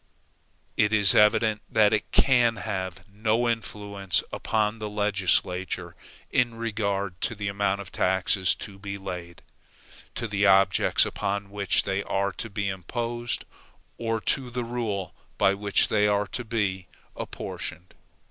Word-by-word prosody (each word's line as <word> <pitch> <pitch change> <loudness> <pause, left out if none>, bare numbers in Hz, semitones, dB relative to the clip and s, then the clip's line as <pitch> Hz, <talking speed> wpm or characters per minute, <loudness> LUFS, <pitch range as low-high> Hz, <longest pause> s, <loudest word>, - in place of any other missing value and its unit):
It 105 - +3
is 105 -3 +5
evident 105 0 +4
that 110 -1 +4
it 105 - -1
can 120 -4 +4
have 95 -4 -5
no 110 +4 0
influence 105 -4 0
upon 110 0 0
the 105 -1 -4
legislature, 95 -3 0 0.4
in 120 -2 +2
regard 100 -5 -2
to 115 - -1
the 100 -1 -4
amount 100 0 0
of 95 - -10
taxes 95 0 +1
to 100 -2 -9
be 100 0 -5
laid, 90 -3 -7 0.7
to 115 - -2
the 100 -1 +2
objects 95 0 +4
upon 100 0 -3
which 100 -2 +1
they 95 0 -1
are 100 0 -1
to 110 +4 -6
be 100 -1 -2
imposed, 120 +6 -3 0.5
or 115 -1 -1
to 130 +2 +2
the 120 0 -3
rule 115 -6 -3 0.2
by 95 - +4
which 100 0 +2
they 105 -1 +3
are 105 0 +2
to 125 - -4
be 95 -5 -1 0.3
apportioned. 90 +1 -6
100 Hz, 140 wpm, -26 LUFS, 95-110 Hz, 0.7 s, is